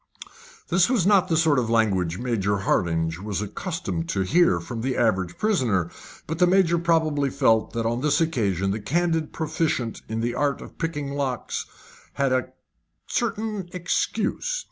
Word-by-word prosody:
This 180 +4 +3
was 235 -9 +2
not 195 -2 +4
the 165 -3 +1
sort 155 -4 +4
of 115 -3 -1
language 95 -7 +1
Major 110 -5 0
Hardinge 80 -3 0
was 100 0 -3
accustomed 100 - -4
to 95 - 0
hear 95 - +3
from 115 +7 -6
the 130 +1 -1
average 95 -7 +1
prisoner, 120 - +1 0.3
but 160 +1 -4
the 180 - +5
Major 175 -2 +3
probably 160 -4 +1
felt 115 -6 +2
that 115 -1 -2
on 120 +2 0
this 150 +2 +2
occasion 100 - 0
the 105 - -2
candid 165 +7 0
proficient 155 -7 -2
in 110 +1 -2
the 120 +1 -1
art 145 -2 0
of - - -12
picking 145 -4 -3
locks 135 -4 -3 0.5
had 140 -1 0
a 130 -2 +1 0.6
certain 215 -4 -2
excuse. 185 - -1
135 Hz, 160 wpm, -24 LUFS, 105-165 Hz, 0.6 s, the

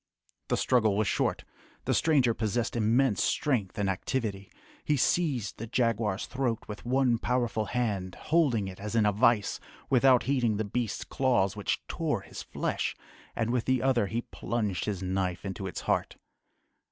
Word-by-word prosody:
The - - +1
struggle 110 -5 +2
was 105 -1 +1
short. - - 0 0.4
The - - +1
stranger 135 -7 +3
possessed 115 +2 -1
immense 115 -1 +2
strength 115 -10 0
and 100 -1 0
activity. 100 0 -2 0.3
He 150 - +1
seized 130 - 0
the 115 - -5
jaguar's 115 -4 0
throat 125 -4 -2
with 105 +2 -8
one 125 -2 +2
powerful 120 -3 0
hand, 100 -6 -2
holding 140 -11 +1
it 95 0 -8
as 105 +2 -5
in 110 -2 +4
a 105 - +4
vice, 110 0 +2 0.3
without 130 -1 +5
heeding 120 -6 +1
the 110 - -1
beast's 115 +1 -2
claws 120 -8 +1
which - - -2
tore - - -1
his - - -9
flesh, - - -2 0.4
and 115 0 0
with 125 -2 0
the 130 -1 +1
other 125 -6 +2
he 115 +4 -2
plunged 105 -6 -2
his 100 -3 -3
knife 95 0 -2
into 95 0 -4
its 90 - -5
heart. - - -1
115 Hz, 165 wpm, -29 LUFS, 100-125 Hz, 0.4 s, without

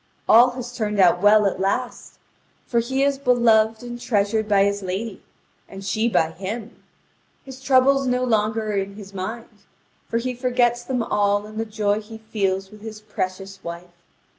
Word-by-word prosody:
All 240 +3 +7
has 245 -1 -7
turned 210 -2 -2
out 175 -1 +5
well 210 +1 +5
at 195 - 0
last; 200 +6 -2 0.5
for 235 - +1
he 265 +4 0
is 280 -1 +1
beloved 225 -4 +3
and 240 0 -7
treasured 215 -1 0
by 200 -1 +4
his 200 0 0
lady, 195 +3 -4 0.5
and 195 0 -9
she 220 +4 0
by 165 -6 +1
him. 210 +6 -7 0.6
His 265 -1 -10
troubles 270 0 +3
no 250 0 +1
longer 220 -2 0
are - - -2
in 195 0 -3
his 200 -1 -11
mind; 220 +5 -5 0.6
for 230 - -1
he 250 +2 -2
forgets 245 -1 +1
them 250 -2 -1
all 205 -1 +1
in 215 +1 -8
the 225 - -1
joy 210 -1 -1
he 220 +1 -11
feels 195 -3 -2
with 210 -1 -14
his 215 -1 -8
precious 195 -2 -5
wife. 170 +1 -8
215 Hz, 175 wpm, -22 LUFS, 200-240 Hz, 0.6 s, All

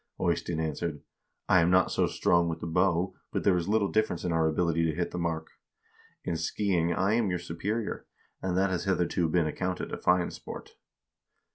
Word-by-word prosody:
Eystein 85 -1 0
answered: 80 -1 -3 0.4
'I 95 - +5
am 85 - +3
not 95 0 +4
so - - +2
strong 85 -1 +2
with 80 0 -3
the - - -5
bow, 90 +2 +1 0.2
but - - -2
there 95 - +4
is 90 +2 -1
little 105 -1 +3
difference 110 -6 0
in 90 - 0
our 80 -1 +2
ability 85 +1 +1
to 80 -2 0
hit 85 0 -2
the 90 - -4
mark. 80 -2 -2 0.7
In 85 - -2
skiing 85 0 0
I 95 +4 +1
am 115 -3 +2
your 90 - 0
superior, 95 +6 -3 0.3
and 90 -1 -1
that 95 0 +2
has 90 - -2
hitherto 90 -3 +1
been 85 0 +2
accounted 90 +4 -3
a - - -3
fine 90 0 +2
sport.' - - -9
85 Hz, 190 wpm, -29 LUFS, 85-95 Hz, 0.7 s, I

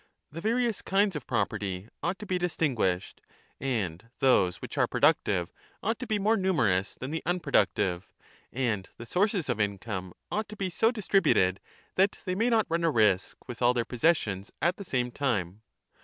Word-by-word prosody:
The 165 +3 -7
various 230 +1 0
kinds 195 -1 +2
of 150 - -6
property 100 -4 -2
ought 175 +3 -1
to 210 - -8
be 185 -2 -1
distinguished, 130 - -1 0.4
and 115 -6 -2
those 95 -9 +3
which - - -7
are - - +3
productive 90 -3 +2 0.3
ought 225 +2 0
to 250 - -5
be 215 -2 +1
more 210 +3 +3
numerous 120 - +1
than 130 +3 -6
the 160 - -2
unpro 175 -5 -2
ductive, 95 -5 +2 0.5
and 115 -7 -1
the 120 - -8
sources 195 - +1
of 120 -4 -1
income 100 -3 -3 0.2
ought 215 0 -2
to 215 - -8
be 190 -2 -2
so 225 +6 +3
distributed 195 - +2 0.4
that 195 +2 +3
they 185 - -1
may 225 +6 +1
not 225 -3 +3
run 170 +1 -1
a 165 - +4
risk 105 -8 +1
with 120 -1 -8
all 125 +1 +4
their 120 -1 0
possessions 115 - 0
at 175 +2 +1
the 200 - -6
same 125 -8 -1
time. 105 -8 -1
130 Hz, 180 wpm, -28 LUFS, -, 0.5 s, a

